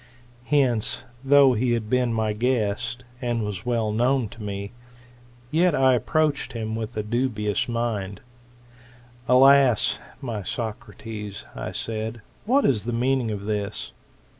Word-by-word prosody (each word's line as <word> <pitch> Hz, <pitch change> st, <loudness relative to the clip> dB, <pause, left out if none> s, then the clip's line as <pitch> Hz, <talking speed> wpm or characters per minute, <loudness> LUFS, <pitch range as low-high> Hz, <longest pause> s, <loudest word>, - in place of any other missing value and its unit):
Hence, 130 Hz, -7 st, +2 dB, 0.2 s
though 140 Hz, -1 st, +6 dB
he 120 Hz, +1 st, +1 dB
had 115 Hz, -2 st, -2 dB
been 125 Hz, +1 st, +1 dB
my 110 Hz, -1 st, 0 dB
guest, 120 Hz, +1 st, -1 dB, 0.2 s
and 120 Hz, -2 st, -1 dB
was 105 Hz, +2 st, -5 dB
well 115 Hz, -3 st, +1 dB
known 120 Hz, +1 st, +1 dB
to 115 Hz, -, -12 dB
me,, 100 Hz, -1 st, -5 dB, 0.8 s
yet 170 Hz, +1 st, +3 dB
I 130 Hz, -1 st, +4 dB
approached 150 Hz, +4 st, 0 dB
him 110 Hz, -1 st, -3 dB
with 110 Hz, 0 st, -5 dB
a 105 Hz, -, -1 dB
dubious 120 Hz, 0 st, -1 dB
mind. 110 Hz, -5 st, -2 dB, 1.1 s
Alas 135 Hz, -2 st, +5 dB
I -, -, -18 dB
my 115 Hz, -5 st, -4 dB
Socrates, 105 Hz, -1 st, -6 dB
I -, -, -5 dB
said, 110 Hz, 0 st, -4 dB, 0.2 s
what 265 Hz, +5 st, +3 dB
is 110 Hz, -6 st, +2 dB
the 120 Hz, -, -2 dB
meaning 125 Hz, 0 st, +1 dB
of 105 Hz, -2 st, -3 dB
this? 105 Hz, -1 st, -3 dB
115 Hz, 140 wpm, -24 LUFS, 105-130 Hz, 1.1 s, though